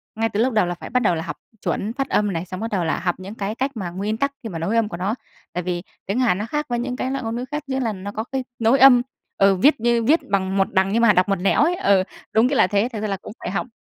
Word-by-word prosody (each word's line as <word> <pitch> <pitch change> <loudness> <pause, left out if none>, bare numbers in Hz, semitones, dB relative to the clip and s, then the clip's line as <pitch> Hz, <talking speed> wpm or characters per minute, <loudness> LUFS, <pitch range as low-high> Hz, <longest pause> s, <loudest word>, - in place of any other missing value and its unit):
ngay 225 +1 0
từ 205 - -3
lúc 250 +2 +2
đầu 215 -4 +3
là 175 0 -3
phải - - -9
bắt 250 - +2
đầu 180 - +3
là 160 - -3
học - - -6 0.2
chuẩn 215 +3 -2
phát 270 +1 -3
âm 210 -2 +1
này, 165 +1 -3
xong 185 0 -7
bắt 225 +2 -4
đầu 190 -4 0
là 160 - 0
học 175 0 -1
những 195 +4 -9
cái 205 +1 -3
cách 270 +3 -1
mà 185 -4 -3
nguyên 200 +5 -3
tắc 280 +4 0
khi 225 - -4
mà 165 - -5
nối 185 +8 -1
âm 225 -2 +2
của 170 - -6
nó. 195 +5 -1 0.4
Tại 180 - -2
vì 175 -1 -3 0.2
tiếng 200 +6 -1
Hàn 240 -8 +3
nó 210 - -3
khác 295 +5 -2
với 240 -1 0
những 250 +1 -3
cái 255 +1 -2
loại 270 -1 -3
ngôn 225 0 -3
ngữ 245 - -3
khác 295 0 -3
như 265 0 -1
là 230 -4 -1
nó 200 +1 -6
có 220 +1 -3
cái 265 +2 -3 0.2
nối 230 +4 +3
âm, 255 -2 +8 0.4
ừ, 195 0 +5
viết 265 +11 +4
như 235 0 +2
viết 305 +8 +4
bằng 195 -1 0
một 195 - +2
đằng 190 +1 +2
nhưng 230 - +3
mà 230 -3 +6
đọc 180 +2 +2
một 195 - +3
nẻo 195 +6 +2
ấy. 345 +3 +2
Ừ, 195 - +3 0.3
đúng 225 +3 +5
nghĩa 280 - 0
là 185 - +5
thế. 205 +5 +1
Thực 215 - -4
ra 215 - -1
là 195 -1 -2
cũng 195 - -10
phải - - -4
học 200 - -2
215 Hz, 325 wpm, -22 LUFS, 190-245 Hz, 0.4 s, âm